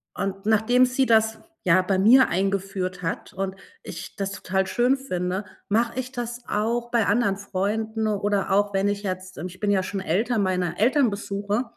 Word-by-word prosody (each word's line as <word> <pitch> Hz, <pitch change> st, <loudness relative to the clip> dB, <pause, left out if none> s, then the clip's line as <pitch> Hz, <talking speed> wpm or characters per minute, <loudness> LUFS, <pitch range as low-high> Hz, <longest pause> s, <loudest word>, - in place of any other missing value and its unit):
Und 195 Hz, +1 st, -4 dB
nachdem 220 Hz, +4 st, +4 dB
sie 255 Hz, +1 st, +1 dB
das, 220 Hz, -1 st, +3 dB, 0.2 s
ja, 185 Hz, +1 st, +5 dB
bei 190 Hz, +1 st, 0 dB
mir 245 Hz, +7 st, +7 dB
eingeführt 190 Hz, -1 st, -1 dB
hat 165 Hz, -, -3 dB
und 190 Hz, 0 st, -3 dB, 0.3 s
ich -, -, -8 dB
das 195 Hz, 0 st, -2 dB
total 190 Hz, -1 st, -1 dB
schön 245 Hz, +6 st, +2 dB
finde, 185 Hz, -6 st, -3 dB, 0.2 s
mache 230 Hz, +3 st, +1 dB
ich 255 Hz, 0 st, -4 dB
das 240 Hz, -1 st, -5 dB
auch 235 Hz, +3 st, -1 dB
bei 235 Hz, -3 st, +2 dB
anderen 205 Hz, -2 st, +2 dB
Freunden 215 Hz, +3 st, -2 dB
oder 205 Hz, -1 st, 0 dB
auch 205 Hz, +1 st, +2 dB
wenn 195 Hz, +1 st, +1 dB
ich 205 Hz, 0 st, -2 dB
jetzt, 185 Hz, -1 st, -5 dB
ähm 180 Hz, -, -4 dB
ich 185 Hz, +1 st, -13 dB
bin 205 Hz, -1 st, +2 dB
ja 190 Hz, -2 st, +3 dB
schon 195 Hz, +1 st, -4 dB
älter, 220 Hz, +7 st, 0 dB
meine 180 Hz, -3 st, 0 dB
Eltern 255 Hz, +2 st, +4 dB
besuche, 200 Hz, +2 st, -2 dB
205 Hz, 185 wpm, -24 LUFS, 190-230 Hz, 0.3 s, mir